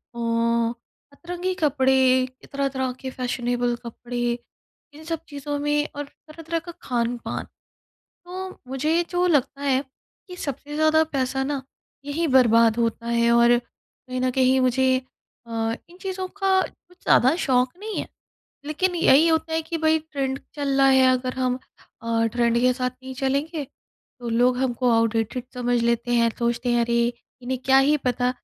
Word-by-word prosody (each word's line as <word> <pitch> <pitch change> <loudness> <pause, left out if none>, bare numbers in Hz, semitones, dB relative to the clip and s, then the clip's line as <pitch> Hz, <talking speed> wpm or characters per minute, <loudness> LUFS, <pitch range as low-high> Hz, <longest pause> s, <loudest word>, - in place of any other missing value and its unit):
अ, - - -6 0.9
अतरंगी 355 +4 -4
कपड़े, 265 -4 +3 0.2
तरह-तरह 275 -2 -1
के 265 - -5
फैशनेबल 245 -1 -1
कपड़े, 240 +1 -3 0.6
इन 310 +2 -12
सब 330 0 -3
चीज़ों 290 0 -4
में, 295 +1 +1
और 290 - -3
तरह-तरह 320 +3 -6
का 345 +1 -9
खान-पान। 240 -1 -2 0.8
तो 370 +1 -6 0.2
मुझे 300 +6 +1
जो 355 0 +1
लगता 285 -3 +1
है 270 -2 +2 0.5
कि 360 - -9
सबसे 290 -1 -5
ज़्यादा 315 +1 +4
पैसा 265 0 0
ना 280 0 -2 0.4
यहीं 310 +4 -1
बर्बाद 230 -4 +5
होता 230 0 -1
है। 235 0 +2
और 235 0 +5
कहीं 255 +1 -10
न 255 0 +1
कहीं 260 0 +3
मुझे 260 +1 +3 0.5
अ, - - -11 0.4
इन 350 - -16
चीज़ों 375 -1 -3
का 385 0 +1
कुछ 360 -1 -9
ज़्यादा 260 +5 +4
शौक़ 255 -3 +1
नहीं 430 +1 -5
है, - - -4 0.6
लेकिन 355 +5 0
यही 320 -1 +5
होता 320 0 +1
है 320 0 0
कि 330 +1 -4
भई, 315 0 +3
ट्रेंड 275 -4 -3 0.2
चल 285 -2 -1
रहा 270 - +6
है, 265 -1 +5
अगर 255 0 -1
हम 255 -1 0 0.4
अ, 230 0 +1
ट्रेंड 235 -1 +2
के 250 +1 +4
साथ 250 0 -2
नहीं 260 0 -7
चलेंगे, 280 +4 -1 0.6
तो 240 - -5
लोग 245 +2 +2
हमको 250 -1 +1
आउटडेटेड 230 +1 +1
समझ 245 -1 0
लेते 235 +1 0
हैं, 235 -1 +4
सोचते 235 +1 -1
हैं, 240 - +3
"अरे! 235 0 +1 0.4
इन्हें 255 +1 -2
क्या 265 0 +5
ही 300 +1 +4
पता 250 0 +1
265 Hz, 160 wpm, -24 LUFS, 245-305 Hz, 0.9 s, रहा